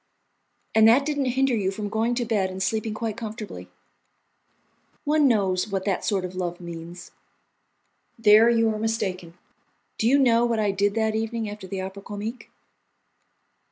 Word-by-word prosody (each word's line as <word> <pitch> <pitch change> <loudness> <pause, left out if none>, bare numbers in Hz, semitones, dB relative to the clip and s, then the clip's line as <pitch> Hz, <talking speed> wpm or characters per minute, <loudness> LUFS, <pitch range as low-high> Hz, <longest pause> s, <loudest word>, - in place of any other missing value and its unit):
"And 220 0 +6
that 255 +5 +5
didn't 290 -2 -1
hinder 270 -1 +3
you 195 -4 0
from 205 +2 -4
going 225 +3 0
to 240 -1 -1
bed 205 -4 0
and 190 0 -4
sleeping 215 +2 -1
quite 220 -1 -3
comfortably. 220 -1 -7 1.3
One 300 0 +3
knows 195 -5 +1
what 195 -2 -3
that 195 -3 -1
sort 195 -3 0
of 180 - -7
love 175 -1 -4
means." 170 0 -9 1.1
"There 220 +1 +6
you 230 -1 +3
are 215 - -4
mistaken. 190 -6 -3 0.6
Do 220 - +2
you 270 +4 +5
know 240 -4 +4
what 235 -1 +1
I 210 -2 +1
did 200 +1 0
that 220 -1 +1
evening, 225 0 -2
after 205 -2 -8
the 190 0 -4
Opera 190 +1 -7
Comique?" 210 +5 -7
215 Hz, 160 wpm, -25 LUFS, 190-230 Hz, 1.3 s, And